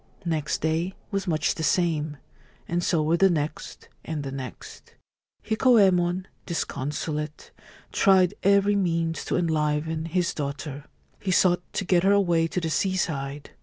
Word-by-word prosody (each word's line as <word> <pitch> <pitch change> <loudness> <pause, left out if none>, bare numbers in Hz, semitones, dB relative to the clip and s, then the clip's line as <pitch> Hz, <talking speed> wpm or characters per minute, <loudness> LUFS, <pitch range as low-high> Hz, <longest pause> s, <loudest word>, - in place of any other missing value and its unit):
Next 155 -3 -1
day 165 +4 -1 0.2
was 195 -1 -2
much 155 -3 +1
the - - -6
same, 155 -2 0 0.5
and 175 +1 -1
so 165 -3 +2
were 160 +3 +2
the 195 +2 +5
next 155 -3 -3 0.2
and 155 -3 -4
the 135 - -5
next. 130 -3 -9 0.5
Hikoyemon, 190 -6 +3 0.2
disconsolate, 150 -1 -4 0.4
tried 190 -2 +4
every 200 +1 +4
means 165 -4 0
to - - -1
enliven 160 -1 0
his 175 +3 0
daughter. 140 0 -5 0.3
He 195 - -4
sought 180 -1 +4
to 195 - -2
get 175 -1 +3
her 195 +2 +4
away 175 -5 +3
to 180 - -2
the 165 -2 -3
seaside. 150 -7 -2
165 Hz, 140 wpm, -25 LUFS, 150-185 Hz, 0.5 s, the